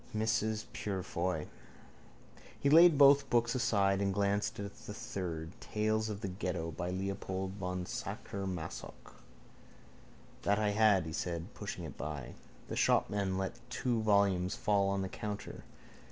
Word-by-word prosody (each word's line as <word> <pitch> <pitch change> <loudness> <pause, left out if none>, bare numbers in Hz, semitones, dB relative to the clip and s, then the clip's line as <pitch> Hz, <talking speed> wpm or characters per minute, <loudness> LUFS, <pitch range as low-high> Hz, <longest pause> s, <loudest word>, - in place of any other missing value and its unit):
Mrs 110 0 0
Purefoy. 90 -4 -2 1.1
He 140 - +2
laid 165 0 +8
both 140 -1 +7
books 120 0 +2
aside 100 -6 +2
and 100 -1 +1
glanced 100 +1 0
at 100 0 -5
the - - -6
third: 80 -4 -4
Tales 110 0 0
of 105 -1 -5
the - - -2
Ghetto 90 -3 -3
by 85 +3 -4
Leopold 95 0 -3
von 90 -1 -3
Sacher 100 +2 -5
Masoch. 90 -4 -7 1.2
—That 100 - +2
I 105 -1 +2
had, 105 -4 +4
he 80 - -5
said, 85 -1 -3
pushing - - -6
it - - -8
by. 75 -4 -5 0.3
The - - -4
shopman 100 -2 +2
let 95 +5 -3
two 125 -2 0
volumes 100 -4 +3
fall 100 -2 +2
on 100 0 0
the - - -2
counter. 105 +2 -6
100 Hz, 140 wpm, -33 LUFS, 90-110 Hz, 1.2 s, laid